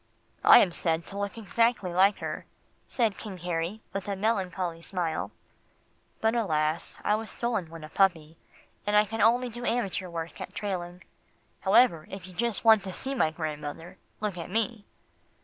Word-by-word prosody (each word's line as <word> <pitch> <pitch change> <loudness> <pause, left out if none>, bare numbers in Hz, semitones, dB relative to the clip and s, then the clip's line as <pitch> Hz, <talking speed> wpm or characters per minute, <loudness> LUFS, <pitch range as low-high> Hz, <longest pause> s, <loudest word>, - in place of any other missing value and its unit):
"I - - +10
am 180 - +5
said 165 -1 -1
to 200 - -8
look 200 +2 -3
exactly 225 -3 +1
like 195 +3 +5
her," - - -5 0.4
said 225 -5 0
King 205 -4 -7
Harry 175 +4 -3
with 195 0 -4
a 200 - -1
melancholy 190 -5 -1
smile, 170 -3 -2 0.9
"but 220 0 +3
alas! 160 -8 0
I 210 - +2
was 220 +1 -2
stolen 225 -8 -2
when 165 -1 -10
a 155 - -8
puppy, 165 -4 +1 0.5
and 205 - +2
I 210 - +6
can 225 +2 -5
do 210 - +5
only 240 +1 +2 0.2
amateur 195 -6 -1
work 165 0 -6
at - - -7
trailing. 180 -3 -4 0.6
However, 190 -5 +4
if 195 -2 -8
you 185 - -11
just 230 +3 0
want 220 -2 +7
to 190 - -4
see 270 +8 -1
my 240 -12 +2
grandmother, 155 0 -6 0.2
look 205 -4 -2
at 170 - -6
me." 225 +1 -1
190 Hz, 170 wpm, -28 LUFS, 170-220 Hz, 0.9 s, I